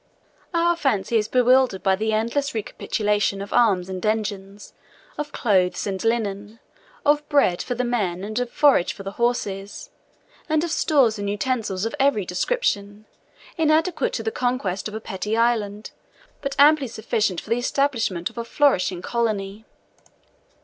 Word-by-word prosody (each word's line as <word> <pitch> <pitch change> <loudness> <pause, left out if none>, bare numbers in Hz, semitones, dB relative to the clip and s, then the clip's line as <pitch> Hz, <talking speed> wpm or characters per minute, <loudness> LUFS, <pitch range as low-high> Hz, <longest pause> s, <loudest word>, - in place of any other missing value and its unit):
Our 345 0 +2
fancy 230 - 0
is 210 -1 0
bewildered 250 -4 +3
by 190 -1 +3
the 220 +3 -1
endless 235 +5 -1
recapitulation 210 -1 -1
of 200 +1 -6
arms 195 -7 +3
and 185 -1 -6
engines, 205 -2 -3 0.4
of 295 -1 -5
clothes 190 -9 +1
and 190 -2 -3
linen, 215 -1 -2 0.5
of 295 0 +2
bread 280 - +3
for 245 - -3
the 250 - -1
men 200 -7 -1
and 225 +4 -2
forage 275 -10 +3
for 195 - -10
the 195 - -5
horses, 205 -4 -2 0.6
and 310 0 +2
of 340 - -2
stores 255 -11 +2
and 200 0 -2
utensils 205 -2 -2
of 225 - -3
every 270 -8 +2
description, 205 - -2 0.5
inadequate 325 +9 +2
to - - -3
the 445 - -1
conquest 245 - -2
of 215 - -8
a - - -3
petty 210 +1 -3
island, 220 -3 0 0.5
but 275 -1 -3
amply 290 -1 +5
sufficient 215 -5 -1
for 220 - -11
the 235 - +2
establishment 235 -9 0
of - - -8
a - - -2
flourishing 230 -9 +1
colony. 215 -3 -2
220 Hz, 150 wpm, -23 LUFS, 200-260 Hz, 0.6 s, amply